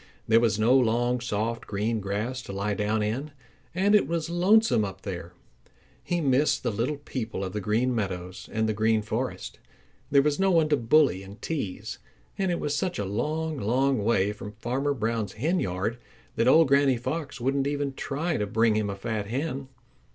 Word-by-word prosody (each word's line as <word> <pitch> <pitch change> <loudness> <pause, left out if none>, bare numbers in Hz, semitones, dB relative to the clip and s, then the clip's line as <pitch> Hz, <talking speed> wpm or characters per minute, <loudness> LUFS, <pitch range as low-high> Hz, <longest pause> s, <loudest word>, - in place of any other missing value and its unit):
There 115 +1 +6
was 115 -3 +2
no 115 +4 +4
long, 120 0 +2
soft 115 0 -2
green 110 +3 -1
grass 105 +6 -3
to 120 - -8
lie 100 +2 -1
down 105 +1 0
in. 125 +8 -2 0.5
And 195 +3 +3
it 210 - +5
was 170 0 -2
lonesome 180 - +4
up 95 -1 -6
there. 90 -3 -6 0.7
He 175 - -1
missed 140 +1 +2
the 120 - 0
little 120 +8 -1
people 115 -8 -5
of 95 - -4
the 105 - -2
Green 115 +6 +1
Meadows 95 -3 -4
and 110 0 0
the 110 - 0
Green 110 0 +2
Forest. 105 - -4 0.5
There 140 -1 +5
was 150 +2 +1
no 195 0 +3
one 165 -4 +3
to 150 - +4
bully 120 - +3
and 100 +2 -11
tease. 140 - -4 0.4
And 195 -2 0
it 175 - 0
was 145 0 -1
such 185 +4 -1
a 100 - -2
long, 155 +9 -2
long 125 +2 +1
way 105 -2 +2
from 105 0 -9
Farmer 130 +6 -1
Brown's 110 -4 -2
henyard 110 - -1 0.4
that 115 - +2
old 160 +4 +6
Granny 140 -2 +4
Fox 135 +3 -4
wouldn't 135 +3 0
even 145 -1 -2
try 155 +5 -2
to 105 - -1
bring 110 +2 +3
him 105 -1 0
a 100 - -3
fat 105 0 -3
hen. 135 +3 -3
120 Hz, 190 wpm, -27 LUFS, 105-145 Hz, 0.7 s, There